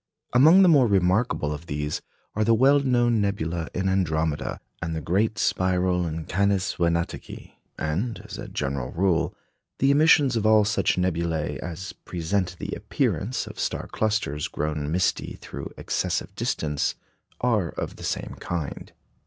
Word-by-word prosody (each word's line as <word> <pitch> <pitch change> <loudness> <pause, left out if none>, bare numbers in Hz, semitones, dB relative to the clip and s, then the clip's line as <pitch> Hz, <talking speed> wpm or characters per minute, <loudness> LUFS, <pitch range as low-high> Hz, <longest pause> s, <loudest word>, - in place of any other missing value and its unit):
Among 160 +10 +7
the - - +6
more 145 -7 +6
remarkable 95 -4 +2
of 75 +3 -8
these 75 0 -2 0.3
are 110 - +1
the 115 +1 +4
well 135 +5 +5
known 120 -4 +2
nebula 85 -5 -1
in 95 +1 0
Andromeda, 80 -5 0 0.2
and 85 0 -3
the - - -1
great 100 +8 0
spiral 90 -1 +1
in 80 0 -4
Canes 100 0 +1
Venatici; 85 -1 -2 0.3
and, 95 +10 -2
as - - -8
a - - -6
general 70 -3 -3
rule, 85 -2 +1 0.4
the 135 +1 +3
emissions 145 -3 +5
of 110 - 0
all 110 -1 +5
such 100 -2 +1
nebulæ 85 -3 -1
as 90 +4 -6
present 90 +1 -2
the - - -5
appearance 120 +6 -1
of - - -10
star - - -2
clusters 105 -10 -1
grown 75 0 -3
misty 90 +1 0
through - - -7
excessive - - -2
distance 75 -2 -1 0.5
are 110 -8 +2
of - - -5
the - - -10
same - - -3
kind. 85 -5 -5
90 Hz, 150 wpm, -25 LUFS, 80-110 Hz, 0.5 s, Among